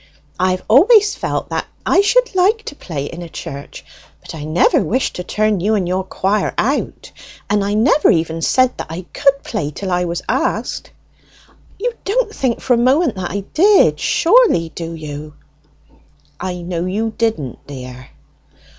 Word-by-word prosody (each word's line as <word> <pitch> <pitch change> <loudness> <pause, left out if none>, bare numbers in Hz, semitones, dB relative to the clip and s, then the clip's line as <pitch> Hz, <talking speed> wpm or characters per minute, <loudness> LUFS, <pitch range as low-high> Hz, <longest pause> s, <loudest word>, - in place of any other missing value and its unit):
I 185 +1 +2
have 185 0 -2
always 410 - +6
felt - - -3
that - - -3 0.2
I - - +4
should - - +2
like 395 +5 +2
to - - -7
play 150 - -5
in 170 +4 -7
a 170 - -8
church, 140 -2 -8 0.3
but - - -11
I 150 -2 -7
never 155 +3 +3
wished 255 +4 -1
to 180 - -4
turn 215 +1 0
you 210 +5 +1
and 190 -4 -1
your 185 +1 -1
choir 195 +2 -1
out; 270 +7 -2 0.4
and 205 -1 +2
I 205 +1 -1
never 260 +7 +4
even 165 -3 +1
said 255 +7 +2
that - - -4
I 170 +3 -6
could 275 0 +2
play 185 -10 -3
till 190 +5 -5
I 180 0 +1
was 170 0 -4
asked. - - -2 0.9
You 480 +4 -2
don't 435 +2 0
think 250 -4 -1
for 255 - +2
a - - +3
moment 260 +4 +3
that 180 -2 -3
I 200 - -3
did, 400 +5 +4
surely, 360 - +3
do 165 +1 -6
you?" 150 -1 -8 1.0
"I 180 -1 -4
know 175 0 -3
you 220 +4 -2
didn't, 220 - -2
dear." 125 -2 -9
200 Hz, 175 wpm, -18 LUFS, 170-275 Hz, 1.0 s, always